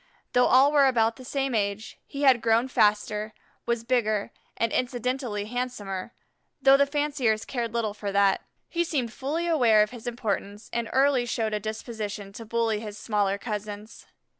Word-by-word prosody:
Though 250 0 +5
all 270 +3 +6
were 285 -2 +5
about 230 -3 +2
the 260 - -11
same 270 0 -2
age, 205 0 -2
he 280 +1 -5
had 260 -4 +5
grown 230 +2 +3
faster, 210 -1 +1 0.3
was 235 -1 0
bigger, 215 -4 0 0.3
and 230 -1 0
incidentally 250 -3 -2
handsomer, 225 -4 -4 0.5
though 270 0 +6
the 280 0 +4
fanciers 280 -7 0
cared 235 -3 -3
little 225 -3 -1
for 205 -1 -4
that. 200 -1 +3 0.3
He 345 0 0
seemed 260 -9 -2
fully 300 +6 -2
aware 240 -11 +5
of 210 - -4
his 240 -1 -9
importance, 210 -3 -3
and 235 -1 -2
early 265 -2 +3
showed 225 -2 -1
a 210 - 0
disposition 210 -2 -5
to 225 +2 -9
bully 225 -1 0
his 210 -1 -7
smaller 205 -3 0
cousins. 210 0 -6
230 Hz, 165 wpm, -26 LUFS, 210-255 Hz, 0.5 s, all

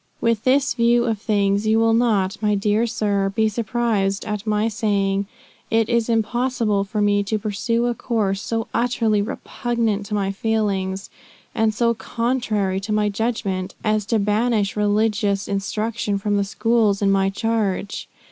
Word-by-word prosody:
"With 230 -2 0
this 265 +2 +3
view 235 0 +3
of 220 -3 -1
things, 205 -1 +1
you 220 +1 +4
will 225 0 +3
not, 215 -5 +2
my 210 -1 +2
dear 210 +3 +1
sir, 205 -3 0
be 220 -1 +3
surprised 215 -3 -1
at 210 0 -4
my 210 +1 +1
saying, 200 -2 0 0.4
it 225 0 +2
is 235 -1 +1
impossible 230 -2 +1
for 210 +1 -2
me 205 0 +3
to 205 +2 -1
pursue 225 +3 -1
a 240 - +1
course 210 -5 -1
so 225 -1 -2
utterly 230 -3 +1
repugnant 220 -1 -2
to 210 - -2
my 195 -1 0
feelings, 195 -2 -1 0.4
and 220 0 +2
so 235 +2 +1
contrary 225 -5 -1
to 200 +2 -5
my 210 0 +2
judgment, 200 -3 -2
as 215 -2 0
to 230 - +2
banish 210 0 +1
religious 210 -1 +1
instruction 210 +1 -2
from 205 +1 -1
the 200 - +2
schools 215 -1 +1
in 195 - +3
my 195 0 +2
charge. 205 -1 -2
215 Hz, 155 wpm, -22 LUFS, 200-230 Hz, 0.4 s, you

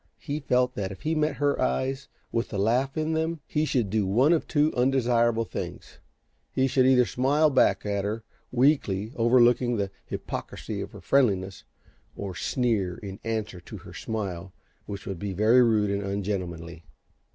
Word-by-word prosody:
He 145 0 -4
felt 125 -3 +1
that, 95 -2 -3
if 95 - -10
he 160 +1 0
met 155 -2 +1
her 145 0 0
eyes 135 - -1 0.2
with 115 0 -1
the 100 - -4
laugh 125 +8 +1
in 155 +1 0
them 160 +1 -1
he 150 0 0
should 120 -10 0
do 105 -3 +1
one 125 - +4
of 165 - 0
two 150 0 +2
undesirable 120 -3 +2
things: - - -7 0.5
he 130 - +1
should 130 -1 +3
either 125 -2 +5
smile 140 - +2
back 135 - +3
at 100 -1 -1
her, 110 +2 -3 0.3
weakly 120 -5 +2
overlooking 120 0 +4
the 100 -1 -2 0.2
hypocrisy - - -5
of - - -7
her - - -10
friendliness, 100 -8 +1 0.5
or 100 -2 -5
sneer 100 - -1
in 100 -1 -8
answer 110 -4 -3
to - - -9
her - - -12
smile, 95 -5 -4 0.4
which 100 0 -6
would 95 -6 -5
be 100 0 -3
very 110 +6 +5
rude 110 -4 +3
and 100 0 -1
ungentlemanly. 90 -4 -4
115 Hz, 170 wpm, -26 LUFS, 100-135 Hz, 0.5 s, either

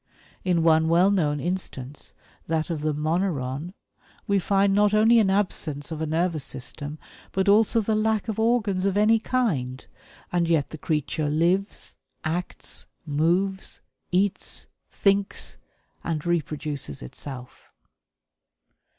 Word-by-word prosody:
In 175 -3 +2
one 160 0 +4
well 175 +4 +5
known 150 -7 +1
instance, 145 -5 -5 0.3
that 160 +1 0
of 155 -3 -2
the 155 0 +1
moneron, 155 0 -1 0.5
we 200 -1 +2
find 195 +1 +2
not 205 +1 +4
only 225 +2 +6
an 205 -3 +3
absence 165 -7 -1
of 160 -1 -4
a 160 - -1
nervous 160 -1 0
system 145 +3 -6 0.4
but 190 +1 +1
also 220 +3 +5
the 220 +1 0
lack 215 0 +1
of 220 -1 -3
organs 215 -5 +2
of 195 0 0
any 220 +2 +5
kind 155 - -1 0.5
and 175 -1 +1
yet 160 -4 +2
the 155 - -7
creature 150 0 -1
lives, 175 +6 0 0.3
acts, 170 +3 -4 0.2
moves, 175 +6 0 0.3
eats, 190 +2 0 0.2
thinks, 200 0 +1 0.5
and 160 -2 -2
reproduces 150 - -2
itself. 125 - -9
175 Hz, 125 wpm, -25 LUFS, 150-200 Hz, 0.5 s, only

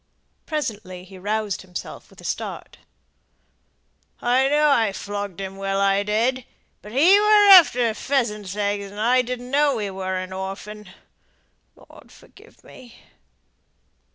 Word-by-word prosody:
Presently 215 - -5
he 190 0 -14
roused 210 +1 -2
himself 180 -2 -9
with - - -20
a - - -14
start: - - -6 1.4
"I 255 +2 +2
know 300 +1 +3
I 225 -7 +2
flogged 200 -2 -6
him 195 0 -6
well, 195 0 -2
I 195 0 +2
did. 230 +5 -1 0.4
But 210 - -12
he 340 - +5
were 420 -1 +5
after 250 - +6
pheasants' 210 -7 -2
eggs, 205 -1 -2
and 205 +1 -11
I 245 +4 +3
didn't 250 0 -6
know 285 -2 +2
he 205 -2 -4
were 190 0 -4
an 185 0 -5
orphan. 195 +2 -7 0.9
Lord, - - -18
forgive - - -20
me!" 245 -3 -15
210 Hz, 135 wpm, -22 LUFS, 195-255 Hz, 1.4 s, after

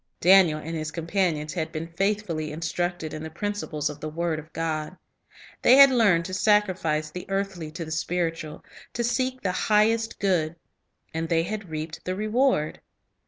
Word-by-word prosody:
Daniel 180 -3 +6
and 165 +2 -6
his 155 -1 -3
companions 165 -2 -1
had 160 -3 -3
been 160 0 -4
faithfully 170 -3 -2
in 155 +2 -7
structed 175 -1 -2
in 155 - -5
the 160 - -6
principles 170 -4 -3
of 150 0 -6
the 155 - -5
word 165 0 -2
of 155 +1 -13
God. 160 +1 -3 0.6
They 255 - +7
had 275 0 +9
learned 200 -9 +3
to 185 - -6
sacrifice 185 -7 +1
the 180 +3 -7
earthly 195 -5 -2
to 165 +2 -6
the 160 - -8
spiritual, 165 -1 -2 0.3
to 235 - -1
seek 255 +2 -1
the 185 - +1
highest 220 +4 +2
good. 170 -5 +1 0.6
And 160 0 -3
they 165 0 +2 0.2
reaped 155 0 -6
the 185 - -2
reward. 215 - +1
170 Hz, 165 wpm, -26 LUFS, 155-200 Hz, 0.6 s, had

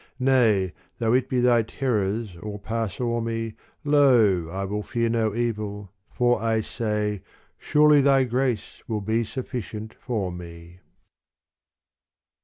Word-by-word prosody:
Nay 115 -8 +3 0.2
though 115 0 +1
it 130 +1 +2
be 125 -1 +1
Thy 120 -1 +4
terrors 110 -4 -2
all 105 -1 -5
pass 110 0 -3
o'er 120 -1 0
me 115 -1 -3 0.3
Lo, 120 - +4
I 95 +3 -3
will 105 +2 -3
fear 115 +2 -1
no 110 -2 0
evil, 105 -4 -3 0.2
for 120 -1 +1
I 110 -1 +1
say, 105 -3 -2 0.4
Surely 150 -1 +5
Thy 135 -1 +4
grace 125 -2 -2
will 110 -3 -2
be 110 +3 0
sufficient 110 -3 -6
for 105 -8 -3
me. 85 0 -10
115 Hz, 130 wpm, -25 LUFS, 105-125 Hz, 0.4 s, Surely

